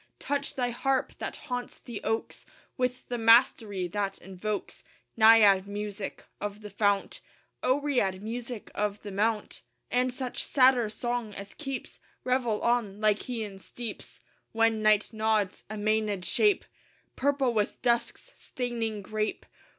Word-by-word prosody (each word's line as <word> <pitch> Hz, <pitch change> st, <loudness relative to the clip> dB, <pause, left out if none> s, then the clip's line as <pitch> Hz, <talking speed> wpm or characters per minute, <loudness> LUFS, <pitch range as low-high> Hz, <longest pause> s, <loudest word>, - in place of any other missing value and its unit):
Touch 285 Hz, 0 st, -2 dB
thy 245 Hz, -2 st, 0 dB
harp, 265 Hz, +2 st, 0 dB
that -, -, -4 dB
haunts 245 Hz, -1 st, -5 dB
the 235 Hz, -3 st, -8 dB
oaks, 225 Hz, +1 st, -2 dB, 0.3 s
With 250 Hz, -1 st, -2 dB
the 245 Hz, -1 st, -2 dB
mastery 225 Hz, -5 st, +4 dB
that 200 Hz, 0 st, -2 dB
invokes 195 Hz, +2 st, -5 dB, 0.3 s
Naiad 220 Hz, -4 st, +7 dB
music 205 Hz, 0 st, -5 dB
of 205 Hz, +1 st, -5 dB
the 210 Hz, -1 st, -9 dB
fount, 200 Hz, 0 st, +1 dB, 0.4 s
Oread 255 Hz, -8 st, +1 dB
music 235 Hz, +2 st, -6 dB
of 210 Hz, 0 st, -2 dB
the 205 Hz, -, -6 dB
mount; 210 Hz, +2 st, -1 dB, 0.3 s
And 250 Hz, +1 st, +2 dB
such 250 Hz, 0 st, -3 dB
satyr 255 Hz, -4 st, +4 dB
song 240 Hz, -1 st, -3 dB
as 200 Hz, 0 st, -8 dB
keeps 270 Hz, -4 st, -6 dB, 0.2 s
Revel 250 Hz, -4 st, 0 dB
on 235 Hz, -5 st, +1 dB
Lycæan 215 Hz, -1 st, -1 dB
steeps, 235 Hz, +1 st, -8 dB, 0.3 s
When 225 Hz, -1 st, +3 dB
night 215 Hz, 0 st, +3 dB
nods, 215 Hz, -3 st, 0 dB
a 215 Hz, -, -5 dB
Mænad 210 Hz, -3 st, 0 dB
shape, 415 Hz, -3 st, +3 dB, 0.5 s
Purple 275 Hz, -2 st, +1 dB
with 210 Hz, -2 st, 0 dB
dusk's 240 Hz, -, 0 dB
staining 230 Hz, -4 st, -3 dB
grape. 215 Hz, +2 st, -2 dB
220 Hz, 130 wpm, -29 LUFS, 205-245 Hz, 0.5 s, Naiad